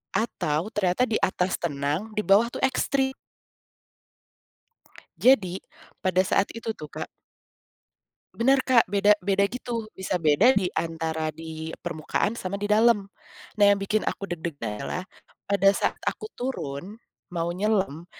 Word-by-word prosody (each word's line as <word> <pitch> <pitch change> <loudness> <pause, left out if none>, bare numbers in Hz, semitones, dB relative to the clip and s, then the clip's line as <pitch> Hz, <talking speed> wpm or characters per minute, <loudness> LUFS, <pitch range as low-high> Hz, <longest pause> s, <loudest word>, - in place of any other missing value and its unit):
Atau 180 -3 -1
ternyata 190 +4 +2
di 225 - 0
atas 185 -1 +1
tenang 155 +7 -2
di - - +3
bawah 210 +5 +5
tuh - - -7
ekstrim. 265 0 0 2.0
Jadi 195 -8 +4 0.5
pada 185 0 +3
saat 195 +1 +2
itu 230 0 -6
tuh, 150 -1 -9
Kak - - -5 1.3
Bener, 265 +3 +3
Kak, 250 -3 +4
beda 205 +2 +4
beda, 200 0 +3
gitu. 235 -2 -5
Bisa 185 -2 -2
beda 175 - +5
di 190 -3 +1
antara 160 -1 -2
di 160 0 -7
permukaan 175 +6 -2
sama 200 +2 -4
di 205 - -2
dalam. 210 -2 +4 0.5
Nah, 205 - +4
yang 200 0 +5
bikin 210 +2 0
aku 200 - -3
deg-degan 145 -9 -4
adalah 185 - -3 0.5
pada 195 -1 +5
saat - - -1
aku 435 - -3
turun 195 - -4 0.4
mau 170 0 -1
nyelam, 190 -4 0
195 Hz, 135 wpm, -26 LUFS, 165-220 Hz, 2.0 s, bawah